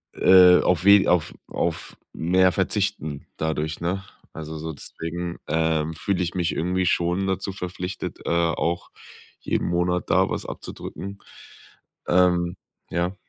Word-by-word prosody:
äh, 90 -1 +7
auf 90 +1 +1
we 100 -1 +7
auf 90 -4 +2
auf - - -3 0.2
mehr 90 +2 +3
verzichten 75 -3 -2
dadurch, 80 0 -2
ne? 95 +3 -2 0.3
Also, 80 0 -7
so 80 +1 -5
deswegen, 85 +4 -6
ähm, 80 -1 0
fühle 90 +3 -1
ich 85 - -3
mich 90 -2 0
irgendwie 90 +2 0
schon 90 +3 +1
dazu 95 +1 -2
verpflichtet, 90 0 -5
äh, - - -2
auch 85 0 0 0.5
jeden - - -1
Monat 90 +1 0
da 95 +2 +3
was - - -3
abzudrücken, 100 +1 -7 0.9
ähm, 90 -1 +3 0.4
Ja. 85 +3 -1
90 Hz, 130 wpm, -24 LUFS, 80-90 Hz, 0.9 s, äh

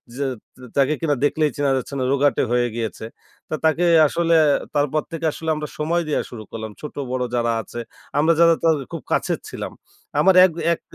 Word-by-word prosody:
যে 140 - -2 0.3
তে 130 - -16
তাকে 140 +2 +3
কিনা 150 -3 +1
দেখলেই 150 +1 +2
চেনা 140 -1 +1
যাচ্ছে 130 - -5
না। - - 0
রোগাটে 140 +1 +2
হয়ে 120 0 +2
গিয়েছে। 110 -1 -4 0.4
তো 155 - -1
তাকে 160 +2 +3 0.2
আসলে 170 +2 +1 0.4
তারপর 145 +1 +1
থেকে 165 0 -4
আসলে 160 +1 -5
আমরা 150 0 -4
সময় 165 +3 0
দেয়া - - +1
শুরু 110 -3 -8
করলাম 110 -1 -6
ছোট-বড় 130 -4 -4
যারা 120 -1 +1
আছে, 120 +3 -8 0.4
আমরা 165 +2 +4
যারা 165 0 +7
তার 165 -1 +4 0.2
খুব - - -5
কাছের - - 0
ছিলাম। - - -6 0.5
আমার 190 -1 +5
এক, 180 - +1 0.2
এক - - -7
145 Hz, 185 wpm, -22 LUFS, 130-160 Hz, 0.5 s, যারা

